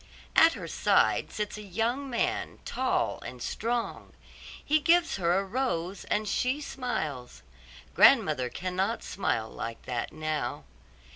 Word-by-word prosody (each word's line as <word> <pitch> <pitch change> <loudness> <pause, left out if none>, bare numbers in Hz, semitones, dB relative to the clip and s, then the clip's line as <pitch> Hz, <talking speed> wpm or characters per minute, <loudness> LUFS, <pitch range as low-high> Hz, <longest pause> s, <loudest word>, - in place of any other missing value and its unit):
At 325 +1 +7
her - - -7
side - - +2
sits 210 0 -4
a - - -7
young 230 +8 -2
man, 365 +10 -1
tall 260 0 0
and 125 - -8
strong; 230 - -3 0.5
he 310 +1 +3
gives 335 0 +3
her 175 -1 +2
a 195 - +1
rose 195 -5 -2
and 210 0 0
she 255 +7 0
smiles. 160 - -4 0.5
Grandmother 125 -1 +5
cannot 185 - -2
smile 115 - -1
like 115 0 -6
that 120 -2 -3
now. 155 -1 -3
210 Hz, 130 wpm, -29 LUFS, 165-260 Hz, 0.5 s, At